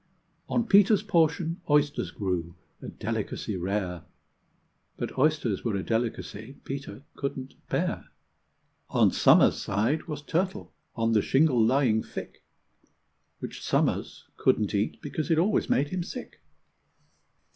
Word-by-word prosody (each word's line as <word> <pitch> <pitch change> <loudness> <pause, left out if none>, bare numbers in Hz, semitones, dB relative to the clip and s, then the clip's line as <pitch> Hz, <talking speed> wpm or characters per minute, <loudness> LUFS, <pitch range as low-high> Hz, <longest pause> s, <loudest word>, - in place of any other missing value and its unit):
On 235 - +1
Peter's 205 -1 +5
portion 170 -2 +1
oysters 145 -10 +2
grew 85 -3 -3 0.3
a - - -7
delicacy 105 - -4
rare, 90 -1 -2 1.0
But - - -4
oysters 135 -7 +1
were 115 -4 -1
a 95 - -2
delicacy 115 +1 -3
Peter 135 0 -6
couldn't 135 -1 -4 0.2
bear. - - -1 0.8
On - - +4
Somer's - - +5
side 115 - 0
was 150 -2 -5
turtle, 185 +5 -2 0.2
on 115 -1 +1
the 110 -2 +4
shingle 135 -3 +3
lying 120 -2 +3
thick, - - -8 0.9
Which - - -7
Somers - - 0
couldn't 105 -2 +2
eat, 100 +1 -1
because 150 +2 -3
it 165 - +3
always 195 +6 +2
made 145 +2 +2
him 185 -1 -2
sick. 245 +8 -8
135 Hz, 125 wpm, -27 LUFS, 110-160 Hz, 1.0 s, Peter's